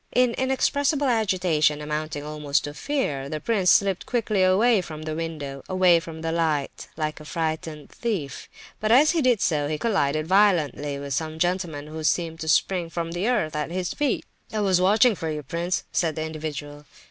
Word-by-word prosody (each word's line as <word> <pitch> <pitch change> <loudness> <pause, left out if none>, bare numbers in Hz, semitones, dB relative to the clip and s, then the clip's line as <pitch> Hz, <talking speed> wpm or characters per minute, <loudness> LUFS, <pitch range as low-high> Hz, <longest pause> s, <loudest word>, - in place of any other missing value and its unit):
In 250 -1 +4
inexpressible 275 +3 +1
agitation, 180 - +2
amounting 150 0 -4
almost 150 -2 -1
to 145 - -5
fear, 150 - -2
the 155 - -3
prince 190 +1 +1
slipped 195 -2 +3
quickly 220 -5 0
away 195 +4 +4
from 155 -3 -8
the 155 0 -4
window, 155 -4 -5
away 185 -2 +5
from 165 -1 -9
the 165 - -1
light, 160 -4 -1
like 155 -1 -3
a - - -10
frightened 155 -1 -4
thief, 180 - -4 0.3
but 215 0 0
as 285 +6 +6
he 330 -2 +1
did 250 -6 +3
so 150 -3 +1
he 155 +1 -2
collided 155 -8 0
violently 160 - +2
with 140 0 -5
some 155 +3 -2
gentleman 175 -4 -1
who 155 +1 -7
seemed 165 0 0
to 160 - -5
spring 175 +2 +2
from 165 0 -4
the 175 +5 -2
earth 210 -12 0
at 150 +1 -2
his 180 +1 -3
feet. 290 -4 -1 0.3
"I 215 - -1
was 190 -3 +2
watching 215 +6 +5
for 165 -4 -4
you, 150 -1 -4
prince," 170 +6 -2
said 160 -3 0
the 155 - -2
individual. 150 -2 -6
165 Hz, 185 wpm, -24 LUFS, 150-200 Hz, 0.3 s, as